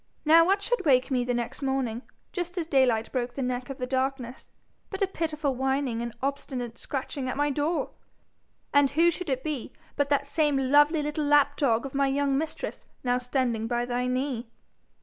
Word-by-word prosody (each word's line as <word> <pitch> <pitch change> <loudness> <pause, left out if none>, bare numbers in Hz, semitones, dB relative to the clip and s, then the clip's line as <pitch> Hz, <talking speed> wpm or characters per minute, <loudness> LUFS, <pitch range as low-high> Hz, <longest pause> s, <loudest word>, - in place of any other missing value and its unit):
Now 325 +2 +7
what 395 +3 +2
should - - 0
wake 265 -2 +3
me 250 -2 +2
the 245 0 -1
next 240 +4 -4
morning, 265 -4 -1 0.3
just 355 0 -4
as 340 - -1
daylight 255 -7 +2
broke 245 -2 -2
the 275 - -2
neck 250 0 -3
of 270 - -5
the 250 - -3
darkness, 260 -1 -3 0.4
but 390 0 -2
a - - +2
pitiful 305 -6 -2
whining 265 -2 -1
and 235 0 -3
obstinate 255 -4 -3
scratching 270 -1 -4
at 255 - -3
my 290 0 +2
door! 300 +4 -1 0.8
And 285 -1 +5
who 330 +5 +4
should 355 0 -5
it 260 -1 -1
be 295 -6 -4 0.2
but 285 -1 0
that 280 -1 +2
same 295 -1 +1
lovely 295 +2 +5
little 300 0 -2
lapdog 285 -4 +3
of 275 - -6
my 275 0 +2
young 275 0 +1
mistress 310 +3 -4 0.2
now 250 0 +1
standing 245 -3 -1
by 240 0 0
thy 245 0 -1
knee! 250 -2 -2
275 Hz, 190 wpm, -27 LUFS, 250-295 Hz, 0.8 s, Now